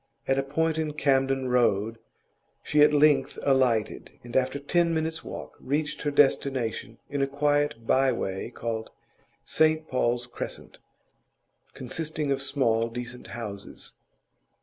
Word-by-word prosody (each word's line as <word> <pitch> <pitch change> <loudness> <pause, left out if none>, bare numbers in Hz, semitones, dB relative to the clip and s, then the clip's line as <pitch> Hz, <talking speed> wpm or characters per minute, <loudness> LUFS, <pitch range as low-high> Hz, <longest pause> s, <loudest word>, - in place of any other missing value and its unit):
At 135 0 +2
a - - +3
point 160 +4 0
in 155 -1 -2
Camden 135 -2 +1
Road 115 -2 +2 0.6
she 150 - +2
at 150 - +7
length 145 -2 +3
alighted, 130 -6 +1
and 120 0 -10
after 130 +1 +2
ten 165 +4 +1
minutes' 160 0 -2
walk - - -8
reached 150 +2 -2
her 145 - 0
destination 135 -5 +1
in 145 -1 -2
a 135 - +2
quiet 145 -3 0
by 130 +2 +3
way 95 -3 -3
called 115 -2 -4 0.6
St 155 0 +2
Paul's 120 -1 0
Crescent, 120 - -8 1.0
consisting 150 +2 -3
of 135 0 0
small, 120 -5 +1
decent 120 +1 -7
houses. 105 -4 -8
135 Hz, 130 wpm, -27 LUFS, 120-150 Hz, 1.0 s, at